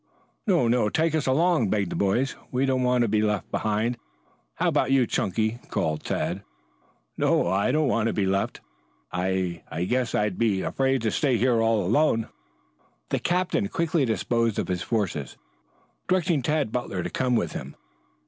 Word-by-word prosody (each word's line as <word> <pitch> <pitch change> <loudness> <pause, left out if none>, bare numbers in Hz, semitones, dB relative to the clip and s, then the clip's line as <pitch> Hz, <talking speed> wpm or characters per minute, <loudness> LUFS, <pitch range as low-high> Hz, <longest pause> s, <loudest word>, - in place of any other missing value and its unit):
"No, 175 - +3
no! 115 -2 +2
Take 160 +6 +1
us 155 -3 0
along," 155 - +3
begged 100 -3 0
the - - -3
boys. 120 +7 +1 0.2
"We 130 +2 +1
don't 130 -1 +1
want 125 -1 +2
to - - +1
be 105 0 +1
left 105 -2 -1
behind. 110 +3 -1 0.6
How - - 0
about - - +2
you, 135 -2 +4
Chunky?" 110 +3 -1
called 75 -1 -1
Tad. - - -2 0.8
"No, - - +2
I 95 +2 +1
don't 155 -1 +2
want 115 -3 +1
to 115 - 0
be 100 - 0
left. 95 +1 -1 0.5
I 90 -1 -1
I 85 - -3
guess 125 +4 0
I'd 105 -3 0
be 105 -5 +1
afraid 135 -2 0
to 110 - +1
stay 135 -6 +1
here 120 0 +2
all 115 -4 +2
alone." 115 - +2 0.8
The - - 0
captain 180 +3 0
quickly 170 -5 0
disposed 115 -1 0
of - - -2
his 90 -1 -1
forces, 85 - -2 0.7
directing 180 -5 +2
Tad 150 -3 0
Butler 100 -7 -3
to - - -4
come 125 -1 +1
with - - 0
him. - - -7
115 Hz, 175 wpm, -25 LUFS, 100-135 Hz, 0.8 s, you